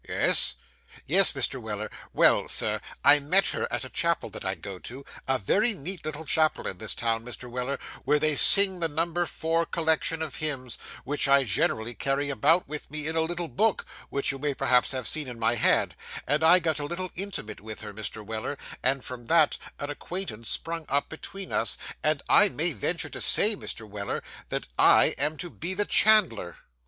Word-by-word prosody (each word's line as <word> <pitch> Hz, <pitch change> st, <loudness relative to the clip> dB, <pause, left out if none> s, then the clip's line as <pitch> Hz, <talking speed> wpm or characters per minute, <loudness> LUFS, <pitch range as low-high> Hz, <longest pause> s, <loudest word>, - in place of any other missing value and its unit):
Yes.' -, -, +2 dB, 0.5 s
'Yes, 190 Hz, +5 st, +7 dB
Mr. 135 Hz, -1 st, -2 dB
Weller. 110 Hz, -1 st, -6 dB, 0.2 s
Well, -, -, +2 dB
Sir, -, -, +1 dB, 0.2 s
I 145 Hz, +1 st, +7 dB
met 180 Hz, +8 st, +1 dB
her -, -, -4 dB
at -, -, -3 dB
a -, -, -9 dB
chapel -, -, -1 dB
that -, -, -9 dB
I -, -, -3 dB
go 95 Hz, -2 st, -9 dB
to; 130 Hz, +7 st, -9 dB, 0.2 s
a 130 Hz, 0 st, +1 dB
very 210 Hz, -, +1 dB
neat 175 Hz, +2 st, -3 dB
little 155 Hz, +1 st, -6 dB
chapel 155 Hz, +1 st, 0 dB
in 90 Hz, -, -5 dB
this 110 Hz, -, -1 dB
town, 115 Hz, -1 st, -2 dB
Mr. 125 Hz, +1 st, -8 dB
Weller, 125 Hz, +3 st, -4 dB, 0.3 s
where 150 Hz, -, +1 dB
they 155 Hz, 0 st, 0 dB
sing 190 Hz, +3 st, +8 dB
the 165 Hz, -, 0 dB
number 165 Hz, +3 st, -2 dB
four 165 Hz, +2 st, -1 dB
collection 160 Hz, -1 st, -1 dB
of 150 Hz, -4 st, -7 dB
hymns, 135 Hz, -6 st, -1 dB, 0.2 s
which 145 Hz, +1 st, +2 dB
I 140 Hz, 0 st, +4 dB
generally 110 Hz, +1 st, 0 dB
carry 140 Hz, +5 st, -2 dB
about 160 Hz, +6 st, +1 dB
with 150 Hz, +1 st, -7 dB
me, 150 Hz, +1 st, -4 dB
in 160 Hz, -, -2 dB
a 160 Hz, -, +1 dB
little 170 Hz, +1 st, -4 dB
book, 215 Hz, -, -1 dB, 0.2 s
which 140 Hz, 0 st, 0 dB
you 135 Hz, -, -8 dB
may 145 Hz, 0 st, -3 dB
perhaps 125 Hz, -1 st, +2 dB
have 130 Hz, -2 st, -3 dB
seen 155 Hz, -3 st, 0 dB
in 125 Hz, -2 st, -9 dB
my 115 Hz, 0 st, 0 dB
hand 120 Hz, -, +1 dB, 0.3 s
and 145 Hz, +3 st, 0 dB
I 165 Hz, +3 st, +7 dB
got 160 Hz, -4 st, -2 dB
a 145 Hz, -, -4 dB
little 175 Hz, +4 st, -6 dB
intimate 180 Hz, -, -6 dB
with 110 Hz, 0 st, -9 dB
her, 105 Hz, -1 st, -7 dB
Mr. 110 Hz, 0 st, -6 dB
Weller, 110 Hz, +6 st, -5 dB, 0.2 s
and 130 Hz, 0 st, 0 dB
from 120 Hz, -2 st, -6 dB
that, 160 Hz, -2 st, +2 dB, 0.2 s
an 145 Hz, +1 st, -6 dB
acquaintance 145 Hz, -, -5 dB
sprung 165 Hz, -1 st, -2 dB
up 140 Hz, +1 st, -1 dB
between 195 Hz, +4 st, -8 dB
us, -, -, 0 dB, 0.2 s
and -, -, -1 dB
I -, -, +5 dB
may -, -, 0 dB
venture -, -, -2 dB
to -, -, -6 dB
say, 215 Hz, +1 st, +6 dB
Mr. 115 Hz, -, -5 dB
Weller, 100 Hz, -1 st, -6 dB, 0.3 s
that -, -, -4 dB
I -, -, +5 dB
am 155 Hz, +1 st, +1 dB
to 175 Hz, +1 st, -6 dB
be 180 Hz, +3 st, -2 dB
the 205 Hz, +2 st, +3 dB
chandler. 190 Hz, -, +3 dB
145 Hz, 200 wpm, -25 LUFS, 125-165 Hz, 0.5 s, sing